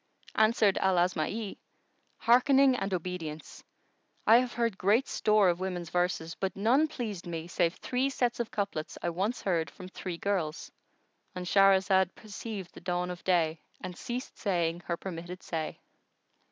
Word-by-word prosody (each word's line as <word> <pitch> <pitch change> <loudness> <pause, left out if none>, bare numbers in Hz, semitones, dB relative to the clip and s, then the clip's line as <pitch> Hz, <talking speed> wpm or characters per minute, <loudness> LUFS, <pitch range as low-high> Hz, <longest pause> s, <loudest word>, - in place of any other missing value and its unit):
Answered 215 -2 +3
Al 190 -1 +3
Asma'i, 180 +4 -1 0.6
"Hearkening 265 +2 +5
and 195 -5 -2
obedience! 170 -4 -5 0.6
I 225 - +8
have 245 -1 0
heard 230 -3 0
great 210 +8 +2
store 215 -2 +3
of 175 0 +2
women's 180 -3 -4
verses; 175 -2 0
but 190 -1 -3
none 245 +10 +3
pleased 215 - -5
me 165 -1 -4
save 170 0 +1
three 260 +2 -1
sets 245 -3 0
of 235 - -1
couplets 200 -7 -3
I 175 - 0
once 195 +8 -2
heard 170 -4 0
from 185 -1 -11
three 185 -2 -5
girls."——And 180 0 -5
Shahrazad 190 -1 +4
perceived 210 -3 -7
the - - -12
dawn 180 0 -1
of 175 - -8
day 165 -4 +1 0.2
and 185 -1 -6
ceased 245 +5 -6
saying 175 -4 0
her 170 - -1
permitted 180 0 -7
say. 160 -2 -3
190 Hz, 150 wpm, -30 LUFS, 175-220 Hz, 0.6 s, I